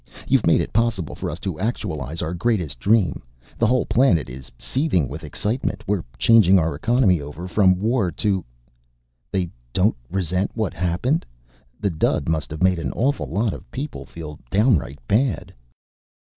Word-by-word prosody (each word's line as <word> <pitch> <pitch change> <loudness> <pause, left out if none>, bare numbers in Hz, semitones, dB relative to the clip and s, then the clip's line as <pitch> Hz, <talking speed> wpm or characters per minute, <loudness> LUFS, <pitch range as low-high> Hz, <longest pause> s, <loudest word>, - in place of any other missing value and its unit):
You've - - +3
made - - +5
it - - -5
possible 110 - 0
for - - -4
us - - -4
to 90 -4 -4
actualize 85 - -3
our 80 - -3
greatest 85 - -1
dream. 100 - +2 0.4
The 115 - +4
whole 125 +1 +2
planet 95 - +3
is 65 +1 -10
seething 130 - 0
with 75 +5 -7
excitement. 105 - -2
We're 100 -4 0
changing 105 -5 +6
our 80 -3 +1
economy 100 - +2
over 75 +5 -7
from 95 -1 +3
war 110 -2 +1
to 95 -1 0 0.4
" - - -45
"They 90 -4 -1 0.2
don't 100 +4 +3
resent 95 +1 0
what 110 -4 -1
happened? 90 - 0 0.6
The 100 -2 0
dud 80 - 0
must 80 -2 -1
have 80 +3 -3
made 95 -2 +3
an - - -2
awful 140 +4 0
lot 105 +6 0
of - - -10
people 140 +3 -6
feel 75 -3 -8
downright 100 - +2
bad." 115 - +1
95 Hz, 165 wpm, -22 LUFS, 80-110 Hz, 0.6 s, changing